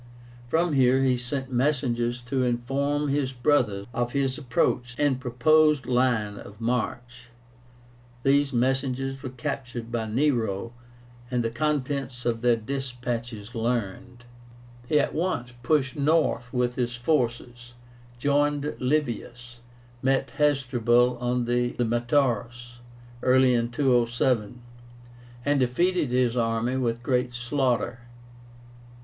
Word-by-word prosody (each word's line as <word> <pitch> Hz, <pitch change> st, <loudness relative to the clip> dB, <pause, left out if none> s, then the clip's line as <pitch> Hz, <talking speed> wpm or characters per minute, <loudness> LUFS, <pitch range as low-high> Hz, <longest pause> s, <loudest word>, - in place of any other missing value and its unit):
From 165 Hz, +5 st, +1 dB
here 130 Hz, -1 st, +4 dB
he 130 Hz, -1 st, +3 dB
sent 130 Hz, +2 st, -4 dB
messengers 125 Hz, -2 st, 0 dB
to 130 Hz, +2 st, -2 dB
inform 140 Hz, +4 st, 0 dB
his 140 Hz, -2 st, 0 dB
brother 120 Hz, -6 st, +1 dB
of 120 Hz, +1 st, -2 dB
his 135 Hz, -2 st, 0 dB
approach 125 Hz, -2 st, -1 dB
and 140 Hz, -3 st, +1 dB
proposed 150 Hz, +4 st, +3 dB
line 120 Hz, -5 st, +1 dB
of 100 Hz, +2 st, -12 dB
march. 120 Hz, +1 st, -3 dB, 0.9 s
These 140 Hz, 0 st, +3 dB
messengers 135 Hz, +1 st, -1 dB
were 130 Hz, -, -5 dB
captured 120 Hz, -2 st, -5 dB
by 115 Hz, -2 st, -2 dB
Nero, 115 Hz, -3 st, 0 dB, 0.6 s
and 125 Hz, -1 st, 0 dB
the 115 Hz, -, -1 dB
contents 135 Hz, -2 st, -2 dB
of 115 Hz, -1 st, 0 dB
their 120 Hz, -1 st, +4 dB
despatches 120 Hz, -2 st, -5 dB
learned. 120 Hz, +1 st, -3 dB, 0.6 s
He 150 Hz, -, +3 dB
at -, -, 0 dB
once 155 Hz, -8 st, -2 dB
pushed 135 Hz, +1 st, +1 dB
north 150 Hz, -4 st, +1 dB
with 125 Hz, -1 st, -1 dB
his 120 Hz, -1 st, -1 dB
forces, 120 Hz, -2 st, -2 dB, 0.4 s
joined 145 Hz, +2 st, +1 dB
Livius, 120 Hz, -3 st, -2 dB, 0.4 s
met 135 Hz, +1 st, +1 dB
Hasdrubal 125 Hz, -4 st, +2 dB
on 125 Hz, 0 st, 0 dB
the 120 Hz, 0 st, 0 dB
METAURUS 120 Hz, -1 st, 0 dB, 0.4 s
early 130 Hz, 0 st, +4 dB
in 120 Hz, -1 st, +1 dB
207, 120 Hz, -3 st, +1 dB, 0.8 s
and 145 Hz, 0 st, +2 dB
defeated 150 Hz, +5 st, +1 dB
his 125 Hz, -1 st, +1 dB
army 115 Hz, +1 st, 0 dB
with 120 Hz, -2 st, -1 dB
great 125 Hz, -1 st, 0 dB
slaughter. 120 Hz, -1 st, -1 dB
125 Hz, 115 wpm, -26 LUFS, 120-135 Hz, 0.9 s, here